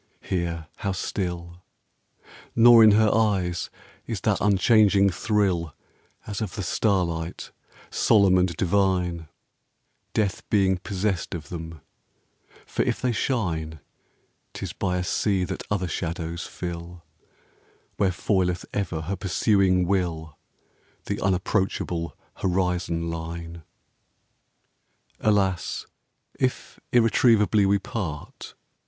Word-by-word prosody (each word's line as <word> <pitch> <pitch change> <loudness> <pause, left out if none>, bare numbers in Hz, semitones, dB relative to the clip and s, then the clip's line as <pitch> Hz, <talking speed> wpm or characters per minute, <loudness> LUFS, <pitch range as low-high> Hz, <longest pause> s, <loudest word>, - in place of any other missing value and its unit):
Here, 85 -3 -2
how 100 -1 -2
still 90 -2 -4 0.6
I - - -36 0.3
Nor 115 0 +8
in 110 -1 +7
her 110 0 +4
eyes 95 -6 +1 0.4
is - - -3
that - - +1
unchanging 100 0 +4
thrill 90 - 0 0.5
As 105 -1 -5
of 105 -5 -4
the 100 - -3
starlight, 90 -5 -1 0.4
solemn 100 -4 +4
and 90 -1 +1
divine, 90 -3 +1 0.9
Death 100 -4 -1
being 95 -3 +2
possessed 95 -1 -2
of 80 - -8
them, 80 -3 -7 0.8
for - - -2
if - - 0
they 125 - 0
shine, 85 - -2 0.7
'T - - -7
is - - -4
by 90 -2 -1
a 90 - -1
sea 95 +1 0
that 90 - -4
other 95 -3 0
shadows 85 -1 -4
fill, 85 -1 -7 0.9
Where 100 - +3
foileth 90 -1 0
ever 90 -6 -2
her 90 +5 -3
pursuing 95 -1 +2
will 85 -5 -1 0.7
The - - -3
unapproachable 90 -2 -1 0.2
horizon 90 -3 -1
line. 85 +1 -6 1.6
Alas! 95 -5 0 0.5
if 130 -1 -2
irretrievably 115 -3 +4
we 100 +1 +4
part 95 -7 -6
90 Hz, 110 wpm, -25 LUFS, 85-100 Hz, 1.6 s, Nor